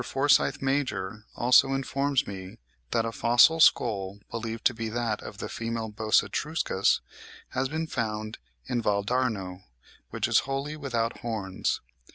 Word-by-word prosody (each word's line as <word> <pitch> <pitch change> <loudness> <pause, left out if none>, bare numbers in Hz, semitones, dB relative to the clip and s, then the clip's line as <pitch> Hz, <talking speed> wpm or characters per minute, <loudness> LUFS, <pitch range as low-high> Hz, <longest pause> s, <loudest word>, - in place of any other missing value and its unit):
Forsyth 135 +1 +2
Major 110 -7 -1
also 130 +2 +5
informs 135 0 0
me 95 -2 -8 0.3
that 115 - +1
a 115 - -2
fossil 120 +8 +5
skull, 100 -10 +3
believed 115 0 -5
to 125 - +5
be 115 -1 -4
that 115 -1 -2
of - - -9
the - - -5
female 115 -1 -4
Bos 110 +1 +2
etruscus, 150 - 0 0.5
has 130 +1 -1
been 160 +2 -2
found 110 -6 -3 0.3
in 120 -1 -1
Val 100 -2 +1
d'Arno, 105 -6 -1 0.5
which - - -1
is - - +4
wholly 140 +2 -2
without 120 -6 -2
horns. 105 -5 -2
115 Hz, 145 wpm, -27 LUFS, 105-135 Hz, 0.5 s, also